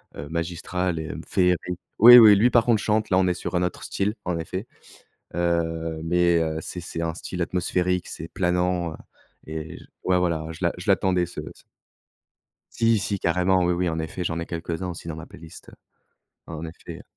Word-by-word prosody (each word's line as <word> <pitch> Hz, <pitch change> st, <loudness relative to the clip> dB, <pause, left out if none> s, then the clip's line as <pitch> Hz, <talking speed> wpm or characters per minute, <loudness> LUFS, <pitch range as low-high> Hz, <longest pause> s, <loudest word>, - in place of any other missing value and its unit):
heu -, -, -6 dB
heu, 70 Hz, -, -10 dB
magistrale 85 Hz, +1 st, -2 dB
et 80 Hz, -1 st, -5 dB, 0.2 s
féérique 90 Hz, -1 st, +1 dB, 0.2 s
oui, 120 Hz, +3 st, +11 dB
oui, 110 Hz, -3 st, +9 dB
lui 115 Hz, +5 st, +4 dB
par 120 Hz, -2 st, +4 dB
contre 115 Hz, -3 st, +3 dB
chante, 110 Hz, 0 st, 0 dB
là 95 Hz, -, +3 dB
on 95 Hz, -, +3 dB
est 90 Hz, -, +2 dB
sur -, -, -6 dB
un 90 Hz, -, +2 dB
autre 90 Hz, -, -3 dB
style, 105 Hz, +3 st, -2 dB
en 90 Hz, -2 st, -1 dB
effet. 95 Hz, +6 st, -5 dB, 0.7 s
Heu, 80 Hz, -2 st, -1 dB
mais, 85 Hz, 0 st, +3 dB
heu, 80 Hz, -1 st, -2 dB
c'est 90 Hz, +2 st, -7 dB
c'est 85 Hz, -1 st, -6 dB
un 85 Hz, 0 st, -2 dB
style 90 Hz, -1 st, -6 dB
atmosphérique, 90 Hz, +1 st, -1 dB
c'est 80 Hz, -, -7 dB
planant, 90 Hz, -1 st, 0 dB
heu -, -, -7 dB, 0.5 s
et 80 Hz, 0 st, -6 dB
je -, -, -15 dB, 0.2 s
ouais 90 Hz, -1 st, +2 dB
voilà, 85 Hz, -3 st, -1 dB
je 80 Hz, -, -10 dB
l'a 85 Hz, -, +1 dB
je 90 Hz, +4 st, -5 dB
l'attendais 95 Hz, -2 st, +2 dB
ce 85 Hz, -, -9 dB
ce -, -, -22 dB, 1.1 s
Si, 115 Hz, -1 st, +3 dB
si 100 Hz, -1 st, -2 dB
carrément. 90 Hz, +2 st, +2 dB
Oui, 85 Hz, -, +2 dB
oui 90 Hz, +1 st, 0 dB
en 80 Hz, -1 st, -2 dB
effet 80 Hz, +3 st, -4 dB
j'en 85 Hz, -1 st, -2 dB
ai 85 Hz, -, -5 dB
quelques-uns 85 Hz, +1 st, -4 dB
aussi 85 Hz, -1 st, -8 dB
dans 80 Hz, -, -4 dB
ma 80 Hz, +1 st, -9 dB
playlist, 80 Hz, -1 st, -13 dB
heu, -, -, -18 dB, 0.7 s
en 80 Hz, 0 st, -6 dB
effet. 80 Hz, +1 st, -10 dB
90 Hz, 205 wpm, -24 LUFS, 80-90 Hz, 1.1 s, oui